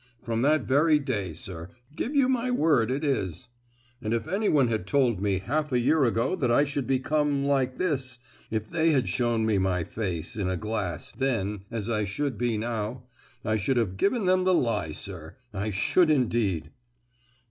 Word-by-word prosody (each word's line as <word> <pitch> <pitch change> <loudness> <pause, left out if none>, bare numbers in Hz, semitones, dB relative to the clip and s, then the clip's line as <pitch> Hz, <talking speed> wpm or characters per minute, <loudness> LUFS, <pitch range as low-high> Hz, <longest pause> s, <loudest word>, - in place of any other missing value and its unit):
From 115 -1 -1
that 150 +4 +3
very 150 +4 +4
day, 115 - -2
sir; 85 +1 -8 0.3
give 265 - -3
you 275 -2 +4
my 255 -1 0
word 155 - +3
it 140 +4 -1
is! 95 - -2 0.5
And 110 0 -1
if 115 - -3
anyone 170 - +2
had 110 -5 -2
told 125 -8 +2
me 100 -2 +1
half 145 +10 -2
a 125 - +3
year 135 +4 +3
ago 115 - +1
that 125 -4 +1
I 145 - +5
should 140 -2 -3
become 140 +2 +1
like 135 -2 +1
this,—if 130 - -3
they 160 +2 +2
had 130 -3 +2
shown 120 -2 +1
me 105 -3 +2
my 95 -2 +1
face 95 +1 -4
in 95 -3 -1
a 95 - -1
glass 95 -6 -3
then 105 -7 -2
as 115 -3 -4
I 105 -3 0
should 135 +6 -2
be 120 -2 0
now, 115 +2 -3 0.4
I 110 0 +1
should 125 +5 0
have 105 -6 0
given 200 - +1
them 185 0 +3
the 185 0 +3
lie, 105 - 0
sir; 80 -1 -8 0.2
I 105 +2 -2
should 155 - +3
indeed!" 110 - +1
120 Hz, 180 wpm, -27 LUFS, 105-145 Hz, 0.5 s, I